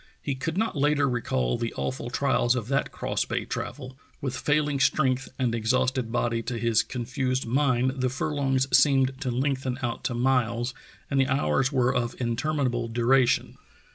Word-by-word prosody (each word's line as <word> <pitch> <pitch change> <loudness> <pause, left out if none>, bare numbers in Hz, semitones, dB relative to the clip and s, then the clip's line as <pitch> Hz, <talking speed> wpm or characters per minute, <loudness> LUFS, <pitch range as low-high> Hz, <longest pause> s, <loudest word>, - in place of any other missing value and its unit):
He 140 - -3
could 160 +6 -4
not 220 +2 0
later 145 0 +2
recall 65 - -1
the 115 - -3
awful 70 -1 -3
trials 120 +1 +2
of 120 -2 -4
that 135 0 0
cross - - -2
bay - - -3
travel. 130 -2 -6 0.2
With 130 -2 -3
failing 150 +1 +1
strength 135 -1 +2
and 125 -3 0
exhausted 125 +1 0
body, 115 -1 0
to 120 +1 -4
his 115 -1 +2
confused 130 +1 -2
mind 130 0 +2
the 130 - +2
furlongs 135 -1 0
seemed 135 -2 +3
to 130 - -1
lengthen 130 0 -1
out 120 -1 -3
to 125 - -1
miles 120 -1 +1 0.4
and 135 - +2
the 135 - +3
hours 135 0 +1
were 130 -2 +2
of 120 -2 -2
interminable 120 0 -1
du 115 +1 -2
ration. 130 -1 +3
130 Hz, 170 wpm, -26 LUFS, 120-135 Hz, 0.4 s, seemed